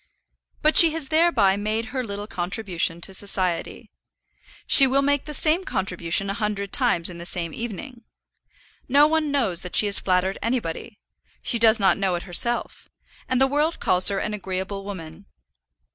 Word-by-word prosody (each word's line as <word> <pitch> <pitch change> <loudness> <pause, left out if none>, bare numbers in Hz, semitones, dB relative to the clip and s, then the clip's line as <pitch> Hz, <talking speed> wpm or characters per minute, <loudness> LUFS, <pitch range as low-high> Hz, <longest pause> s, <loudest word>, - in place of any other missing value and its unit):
But 310 +1 +2
she 330 -2 +8
has 315 -4 -5
thereby 310 - +2
made 215 +3 -3
her 260 -2 -3
little 205 -2 -7
contribution 175 -3 -4
to 190 - -6
society. 185 -3 -2 0.7
She 275 - +9
will 275 +2 0
make 285 0 0
the 300 - -8
same 320 +6 0
contribution 185 - -3
a 195 - -3
hundred 205 -2 -4
times 170 0 0
in 175 -2 -7
the 170 - -9
same 170 -3 -1
evening. 235 +2 -8 0.9
No 285 +3 +5
one 310 0 0
knows 225 -12 0
that 180 - -7
she - - +5
has 200 -1 +3
flattered 185 +1 -1
anybody; 230 -2 -4 0.5
she 235 - +1
does 225 0 +4
not 195 0 +2
know 190 -2 -1
it 175 - -6
herself; 235 +7 0 0.4
and 255 -1 0
the 265 - +4
world 295 +4 -1
calls 185 0 +3
her 200 - +3
an 210 +2 -4
agreeable 195 0 -6
woman. 185 -2 -10
205 Hz, 170 wpm, -22 LUFS, 185-265 Hz, 0.9 s, She